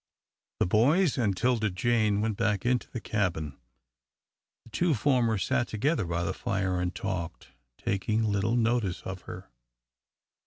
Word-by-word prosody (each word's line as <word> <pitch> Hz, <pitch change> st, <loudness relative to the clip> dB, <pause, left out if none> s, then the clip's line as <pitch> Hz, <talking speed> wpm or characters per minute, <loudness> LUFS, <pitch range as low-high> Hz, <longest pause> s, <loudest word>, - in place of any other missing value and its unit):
The -, -, +3 dB
boys 140 Hz, -, +3 dB
and 105 Hz, -7 st, 0 dB
'Tilda 115 Hz, -2 st, +2 dB
Jane 105 Hz, +1 st, +1 dB
went 110 Hz, -1 st, 0 dB
back 100 Hz, 0 st, 0 dB
into 125 Hz, 0 st, +1 dB
the 120 Hz, -, -5 dB
cabin. 85 Hz, -10 st, -2 dB, 1.1 s
The 115 Hz, -, -18 dB
two 170 Hz, +1 st, +2 dB
former 120 Hz, -2 st, +2 dB
sat 120 Hz, +4 st, 0 dB
together 110 Hz, -, 0 dB
by 85 Hz, 0 st, -1 dB
the 95 Hz, -, -1 dB
fire 95 Hz, -2 st, -1 dB
and 90 Hz, 0 st, -2 dB
talked, 85 Hz, -10 st, -4 dB, 0.3 s
taking 105 Hz, +3 st, 0 dB
little 105 Hz, +2 st, +1 dB
notice 115 Hz, -5 st, 0 dB
of 95 Hz, -1 st, -6 dB
her. -, -, -9 dB
105 Hz, 145 wpm, -28 LUFS, 95-120 Hz, 1.1 s, The